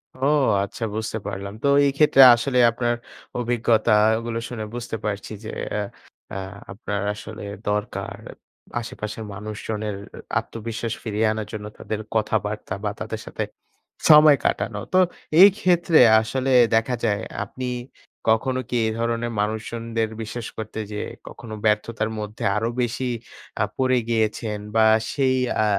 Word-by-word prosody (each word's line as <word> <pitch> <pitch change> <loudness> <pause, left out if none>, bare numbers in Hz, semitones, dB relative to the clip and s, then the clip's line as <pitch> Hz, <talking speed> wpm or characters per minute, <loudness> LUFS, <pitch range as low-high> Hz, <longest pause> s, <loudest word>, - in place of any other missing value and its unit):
ও 130 - -2 0.4
আচ্ছা, 100 +3 -6
বুঝতে 110 0 -2
পারলাম। 100 0 -5
তো - - +3 0.2
এই 140 - +3
ক্ষেত্রে 150 -3 +6
আসলে 125 +2 -1
আপনার 120 0 0 0.4
অভিজ্ঞতাগুলো 115 -1 +2
শুনে 110 -3 -5
বুঝতে 120 -1 -4
পারছি 105 0 -3
যে 110 - -6 0.3
এ - - 0 0.5
আ - - -3 0.3
আপনার 100 0 -4
আসলে 105 +1 -9 0.3
দরকার 105 0 -3 0.6
আশেপাশের 110 -1 -6
মানুষজনের 105 +1 -4 0.4
আত্মবিশ্বাস 115 0 -5
ফিরিয়ে 110 -1 0
আনার 110 -1 -4
জন্য 105 -1 -5
তাদের 110 - -4 0.2
কথাবার্তা 105 -2 -1
বা 105 - 0
তাদের 110 - -4
সাথে - - -3 0.7
সময় 150 -1 +9
কাটানো। 110 - 0 0.2
তো 185 - +6 0.4
এই 200 - +11
ক্ষেত্রে 175 -3 +4 0.2
আসলে 130 +4 -1 0.2
দেখা 115 +3 +2
যায় 105 -2 +1 0.2
আপনি 130 -1 -6 0.7
কখনো 130 +3 -2
কি 125 - 0
এধরনের 115 +1 -1
মানুষজনদের 115 +1 -2
বিশ্বাস 110 +1 -5
করতে 110 0 -5
যেয়ে 105 - -4 0.2
কখনো 115 -2 -9
ব্যর্থতার 110 +1 +1
মধ্যে 105 0 -6
আরো 110 +2 0
বেশি 125 +2 -1 0.5
আ - - +4
পড়ে 130 -1 +3
গিয়েছেন? 110 -1 0 0.2
বা 110 0 +6 0.3
সেই 135 -2 +2 0.3
আ - - +3
110 Hz, 135 wpm, -23 LUFS, 105-120 Hz, 0.7 s, এই